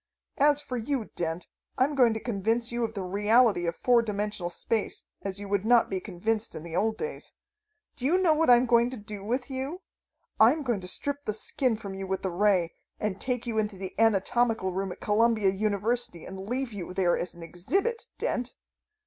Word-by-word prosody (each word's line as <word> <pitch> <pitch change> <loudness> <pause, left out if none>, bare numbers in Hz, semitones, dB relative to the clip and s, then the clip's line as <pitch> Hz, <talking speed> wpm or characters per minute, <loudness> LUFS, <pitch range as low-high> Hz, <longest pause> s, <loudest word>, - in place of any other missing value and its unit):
"As 290 +1 +5
for 255 - -4
you, 240 0 -2
Dent. 165 +1 -3 0.3
I'm 265 +3 +2
going 245 -5 +4
to - - -2
convince 230 +2 0
you 235 0 -1
of 225 0 -3
the 195 - -3
reality 205 0 +3
of 170 - -1
four 245 -1 +4
dimensional 210 -4 -3
space 215 +4 -2 0.2
as 195 0 -4
you 205 - -6
would 200 -1 0
not 235 -1 +4
be 190 - 0
convinced 215 +4 -2
in 155 - -7
the 170 -1 -7
old 220 +4 +1
days. 460 +1 -6 0.6
Do 255 - -1
you 345 +5 +4
know 360 -4 +4
what 315 -1 +2
I'm 245 +1 +7
going 235 0 +4
to 255 - -5
do 205 -1 -6
with 250 +5 -2
you? 270 +8 -4 0.6
I'm 260 +8 +5
going 240 -7 -1
to 180 - -6
strip 285 +8 -2
the 215 - -1
skin 240 +3 0
from 205 -3 -7
you 190 0 -5
with 190 0 -2
the 190 - -1
ray, 180 -2 +2 0.3
and 205 -3 -3
take 250 -2 -1
you 225 -2 -1
into 210 -1 -1
the 190 -1 -6
anatomical 225 -1 +2
room 190 0 -2
at - - -10
Columbia 215 -1 +3
University 210 -1 -1
and 190 +1 -8
leave 255 -1 -2
you 180 -2 -6
there 180 -3 +3
as 175 - -4
an 170 - -10
exhibit, 390 - -1
Dent!" 245 0 -2
220 Hz, 205 wpm, -28 LUFS, 195-245 Hz, 0.6 s, I'm